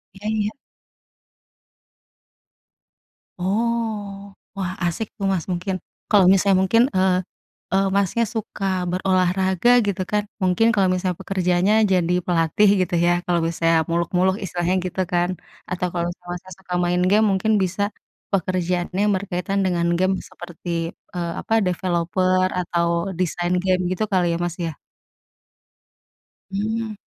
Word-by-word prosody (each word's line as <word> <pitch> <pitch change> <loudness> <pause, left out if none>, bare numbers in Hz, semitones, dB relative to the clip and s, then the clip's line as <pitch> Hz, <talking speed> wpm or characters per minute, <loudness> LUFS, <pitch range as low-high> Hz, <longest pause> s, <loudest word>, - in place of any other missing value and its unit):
Iya 200 +2 -7
iya. 215 -1 0 2.9
Oh, 205 0 -2 0.2
wah, 190 -2 -2
asik 175 +6 -2
tuh, 195 - -3
Mas, 175 -4 -1
mungkin, 180 +2 -2 0.3
kalau 200 -3 +5
misalnya 195 0 +4
mungkin, 230 +5 +4
eee 185 0 +3 0.6
eee, 195 +1 +3
Masnya 200 +4 +2
suka 215 -2 -5 0.3
berolahraga 185 +2 +1 0.2
gitu 200 -2 -1
kan, 210 0 +1 0.2
mungkin 185 +4 +3
kalau 195 -3 +3
misalnya 180 -1 -1
pekerjaannya 185 +1 +1 0.2
jadi 180 -2 +2
pelatih 175 +4 +3
gitu 180 -1 -1
ya. 175 - +4
Kalau 175 -1 +1
misalnya 165 0 +1 0.2
muluk-muluk 180 +2 +1
istilahnya 175 0 -1
gitu 185 +1 -2
kan 175 0 +2 0.4
atau 180 0 -1
kalau 170 -1 -1 0.2
Masnya, 180 +1 -7
suka 185 -1 -8
main 175 0 +1
game 215 +2 +4
mungkin 195 +3 +1
bisa 190 +2 -1 0.5
pekerjaannya 180 -1 -1
yang 210 0 +3
berkaitan 185 +1 -2
dengan 175 -2 +1
game 190 +1 +2
seperti, 175 +1 -10 0.5
eee, 170 -1 -2
apa, - - -3
developer 185 +1 +1
atau 170 -1 0 0.3
desain 175 0 0
game 185 -1 +2
gitu 185 +3 -1
kali 185 -2 +3
ya, - - -1
Mas, 175 -1 -2
ya. 160 - -6 1.8
Mmm. 215 +2 -2
185 Hz, 130 wpm, -22 LUFS, 175-200 Hz, 2.9 s, kalau